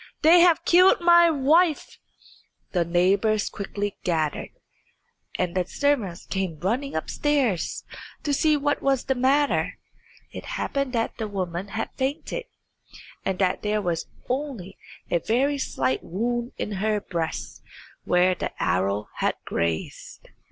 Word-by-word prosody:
They 330 +3 +8
have 345 -1 +4
killed 365 +2 +6
my 345 0 +6
wife." 315 +2 +2 0.7
The 175 -2 +2
neighbours 195 +5 +2
quickly 205 0 -4
gathered, 160 -4 -1 0.9
and 180 -2 -1
the 180 -1 -1
servants 235 -12 -1
came 190 -5 -3
running 245 +10 -1
upstairs 245 - 0 0.4
to 290 - 0
see 305 +2 +3
what 290 0 0
was 270 -2 +1
the 265 - +1
matter. 270 +3 +1 0.5
It - - -8
happened 275 -2 -2
that 230 0 -1
the 220 - -2
woman 185 -2 -4
had 220 +2 -4
fainted, 290 - -3 0.8
and 190 -1 -1
that 185 -1 +1
there 210 0 0
was 175 -4 -2 0.2
only 250 -8 -4 0.4
a 170 - +3
very 270 - +1
slight 130 - -1
wound 240 +6 -2
in - - -3
her 215 0 +1
breast 170 -5 -4 0.4
where 180 +1 +3
the - - -4
arrow 100 +3 0
had - - +1
grazed. 85 -1 -4
215 Hz, 130 wpm, -25 LUFS, 180-280 Hz, 0.9 s, They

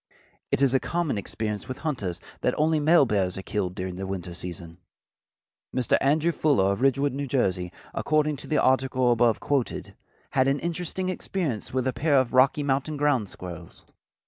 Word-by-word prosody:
It 140 - +2
is 135 -2 +4
a 135 - +4
common 165 -10 -1
experience 105 +2 -4
with 130 - -5
hunters 105 - -2 0.2
that - - 0
only 155 +1 +2
male 155 0 +5
bears 95 -6 0
are 95 - -5
killed 95 -4 -2
during 90 -1 -4
the 95 0 -4
winter 90 -2 -4
season. 85 -1 -6 1.0
Mr. 130 -2 +2
Andrew 155 +5 +3
Fuller 135 - +2
of 100 +4 -3
Ridgewood, 135 +1 +2
New 140 +1 -3
Jersey, 95 -10 0 0.2
according 150 -1 +1
to 140 - -8
the 155 - +1
article 130 -1 +2
above 120 -1 +3
quoted, 140 -4 -2 0.4
had 130 0 +2
an 135 +1 +2
interesting 175 +2 -3
experience 170 - -3
with 130 0 -1
a 130 - 0
pair 150 -1 +1
of 130 -1 -1
Rocky 135 +3 +4
Mountain 140 +2 -1
ground 140 -8 +1
squirrels. 85 -2 -10
130 Hz, 175 wpm, -26 LUFS, 100-145 Hz, 1.0 s, male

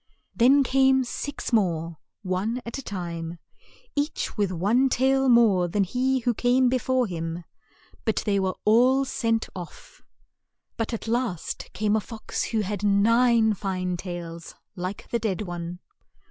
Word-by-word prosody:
Then 270 +4 +5
came 265 0 +3
six 280 +2 -5
more, 170 -6 0 0.2
one 195 +6 -1
at 235 +4 -5
a - - -5
time, 170 -6 -5 0.6
each 295 +2 -2
with 205 -3 0
one 215 +10 +2
tail 265 +1 +2
more 215 -7 +5
than 200 +4 +1
he 255 +6 0
who 240 0 +1
came 250 +2 +3
be 255 +1 +1
fore 255 +1 +1
him, 165 -2 -4 0.6
but 220 - 0
they 200 -2 +2
were 190 -1 -1
all 255 +5 +4
sent 230 -3 -1
off. 175 -3 -10 0.7
But 225 0 -2
at 230 -1 -5
last 230 -8 -2
came 210 0 +1
a - - +3
fox 225 +1 -4
who 220 -2 -1
had 205 0 -4
nine 225 +2 +4
fine 185 -2 -2
tails, 170 -2 -7 0.2
like 185 +1 -5
the 235 - +1
dead 215 -2 -2
one. 175 -1 -5
215 Hz, 150 wpm, -25 LUFS, 185-250 Hz, 0.7 s, Then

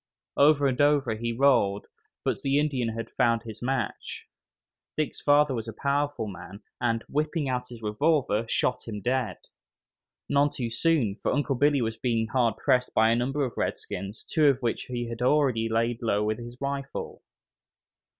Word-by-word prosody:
Over 145 0 +5
and 130 0 +1
over 145 -4 +3
he 115 +2 -3
rolled, 115 -6 +2 0.4
but - - -1
the 135 0 +1
Indian 140 -6 0
had 115 0 -5
found 115 -2 +1
his 110 -2 -9
match. 125 -3 -3 0.7
Dick's 155 -1 -2
father 145 -1 +4
was 115 -2 -4
a 115 - -5
powerful 140 -1 -1
man, 95 +1 -9 0.2
and, 115 -1 0
whipping 150 0 -1
out 125 -1 -2
his 120 -2 -11
revolver, 115 0 +1
shot 125 - 0
him 105 -2 -5
dead. 125 0 -1 0.9
None 145 +1 +3
too 120 -5 -4
soon, 120 -6 +1
for - - 0
Uncle 145 +1 0
Billy 140 0 +2
was 110 0 -3
being 115 -1 0
hard 120 -4 +1
pressed 125 +2 +1
by 110 +1 +5
a - - +3
number 135 +4 0
of 120 - -7
redskins, 100 +3 -4
two 155 -2 +2
of 140 -2 +4
whom 120 -2 +1 0.2
he 120 0 -2
had 115 0 -6
already 125 -4 +2
laid 115 +1 0
low 105 -3 +1
with 110 +2 -1
his 120 +1 -9
rifle. 140 0 -4
125 Hz, 170 wpm, -27 LUFS, 115-140 Hz, 0.9 s, Over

